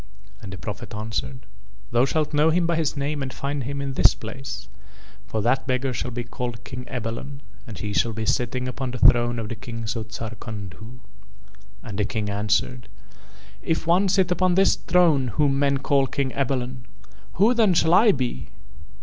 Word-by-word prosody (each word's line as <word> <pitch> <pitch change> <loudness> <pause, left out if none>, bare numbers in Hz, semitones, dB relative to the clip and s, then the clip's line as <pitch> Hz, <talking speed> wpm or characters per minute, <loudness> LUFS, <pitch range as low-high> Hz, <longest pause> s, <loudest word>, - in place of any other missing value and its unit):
And 100 - -8
the 95 - -7
Prophet 105 +3 -7
answered: 110 +4 -4 0.5
"Thou 120 +2 +4
shalt 155 +2 -1
know 150 +2 +4
him 170 +2 +2
by 170 0 +1
his 160 -2 -1
name 145 +1 -2
and 135 -1 -3
find 140 -1 -3
him 140 +2 -4
in 135 -1 -3
this - - +5
place, 110 -5 -7 0.6
for 110 -2 -2
that 130 +4 +1
beggar 130 0 0
shall 125 - -3
be 120 0 -4
called 120 0 -5
King 125 -1 -7
Ebalon 125 +4 -5 0.3
and 105 -5 -8
he 105 -1 -4
shall 115 - +2
be 110 0 -4
sitting 125 +3 0
upon 130 +1 -3
the 125 - -5
throne 120 -1 +5
of 115 -2 -3
the 115 - -4
Kings 115 0 -5
of 110 -1 -4
Zarkandhu." 110 0 -7 0.9
And 105 -2 -6
the 105 - +2
King 105 -1 -2
answered: 105 +4 -1 0.7
"If 165 -1 -1
one 180 +4 +3
sit 190 -1 +2
upon 180 0 +2
this 195 +1 +5
throne 165 -7 +3
whom 140 -2 +3
men 140 -1 +2
call 135 0 +2
King 135 0 -1
Ebalon, 130 -2 -2 0.5
who 210 +7 +4
then 220 -7 +3
shall 160 0 +4
I 215 +4 +7
be?" 125 - -3
125 Hz, 185 wpm, -24 LUFS, 115-145 Hz, 0.9 s, I